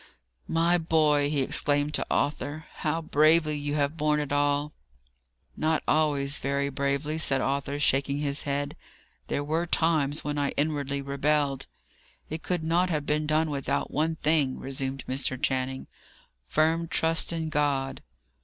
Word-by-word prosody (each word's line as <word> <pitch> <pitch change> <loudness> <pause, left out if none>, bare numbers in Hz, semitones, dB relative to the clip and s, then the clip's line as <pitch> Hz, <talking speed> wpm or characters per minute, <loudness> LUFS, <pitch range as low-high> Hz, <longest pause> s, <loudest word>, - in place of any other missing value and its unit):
"My 170 +2 +2
boy!" 155 -3 +2
he 145 -2 0
exclaimed 145 +2 +1
to - - -1
Arthur, 145 +2 -1
"how 160 +2 -1
bravely 155 +1 +3
you 145 0 -2
have 145 +2 0
borne 150 0 +2
it 145 -2 -3
all!" 145 +1 +1 0.8
"Not 155 -1 0
always 145 -2 +2
very 140 0 -1
bravely," 140 +3 -1
said 135 -3 +4
Arthur, 140 +2 -1
shaking 140 -1 +2
his 145 0 -1
head. 145 0 -2 0.5
"There 145 - -1
were 160 +4 -1
times 155 -3 +1
when 145 0 -2
I 140 -1 0
inwardly 140 -2 -1
rebelled." 140 - 0 0.6
"It 160 +1 -4
could 165 +2 -2
not 175 +3 +2
have 150 -4 -1
been 150 +1 0
done 155 0 +1
without 140 -2 -2
one 160 +2 0
thing," 150 -4 +1
resumed 135 0 -4
Mr. 130 -1 -1
Channing: 130 0 -1 0.6
"firm 160 - +1
trust 165 0 +1
in 165 -1 -3
God." 140 -3 0
145 Hz, 145 wpm, -27 LUFS, 140-155 Hz, 0.8 s, said